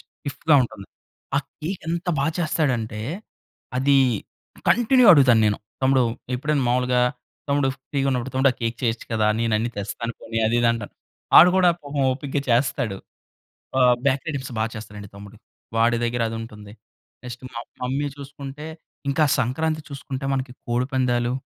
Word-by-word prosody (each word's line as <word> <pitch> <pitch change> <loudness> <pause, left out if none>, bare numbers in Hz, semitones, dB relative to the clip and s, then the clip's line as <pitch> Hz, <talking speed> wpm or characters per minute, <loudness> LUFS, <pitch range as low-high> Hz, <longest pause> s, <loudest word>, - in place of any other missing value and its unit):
స్టిఫ్‌గా 150 +2 -2
ఉంటుంది. 110 -5 -7 0.5
ఆ - - +5 0.2
కేక్ 175 +5 -4
ఎంత 170 +2 -2
బా 140 - +1
చేస్తాడంటే, 130 -10 -1 0.8
అది 140 +2 +3 0.7
కంటిన్యూ 245 +1 +5
అడుగుతానేను. 115 - +5 0.2
తమ్ముడు 130 0 +4 0.3
ఎప్పుడైనా 145 +2 0
మామూలుగా 125 0 +2 0.5
తమ్ముడు 140 -1 +2 0.2
ఫ్రీ‌గా 140 -1 0
ఉన్నప్పుడు 130 0 -2
తమ్ముడు 135 +1 +4
ఆ - - -19
కేక్ 115 +1 -1
చేయొచ్చు 115 -2 -1
కదా! 110 -1 +2
నేను 115 -1 0
అన్ని 115 +2 -1
తెస్తాను 105 +3 -4
పోనీ 115 0 -4
అది, 115 +2 +1
ఇది 120 - +4
అంటాను. 115 -3 -6 0.4
వాడు 180 - +10
గూడా 185 -1 +5
పాపం 145 -1 -4
ఓపికగా 140 +1 -3
చేస్తాడు. 120 -4 +1 0.8
ఆహ్, 125 -1 +6
బ్యాక్‌రి 140 +3 +1
ఐటమ్స్ 135 -2 -5
బాగా 110 +1 0
చేస్తాడండి 105 -2 -9
తమ్ముడు. 100 +2 -11 0.4
వాడి 115 +1 +3
దగ్గర 120 0 -1
అదుంటుంది. 105 -2 -8 0.5
నెక్స్ట్ 125 0 -8
మా 115 - -5 0.2
మమ్మీ 135 +3 -1
చూసుకుంటే 140 +1 -9 0.4
ఇంకా 140 +3 +3
సంక్రాంతి 155 +6 0
చూసుకుంటే 135 -1 -6
మనకి 130 -1 -2 0.2
కోడిపందాలు, 125 -1 0
130 Hz, 145 wpm, -23 LUFS, 115-140 Hz, 0.8 s, వాడు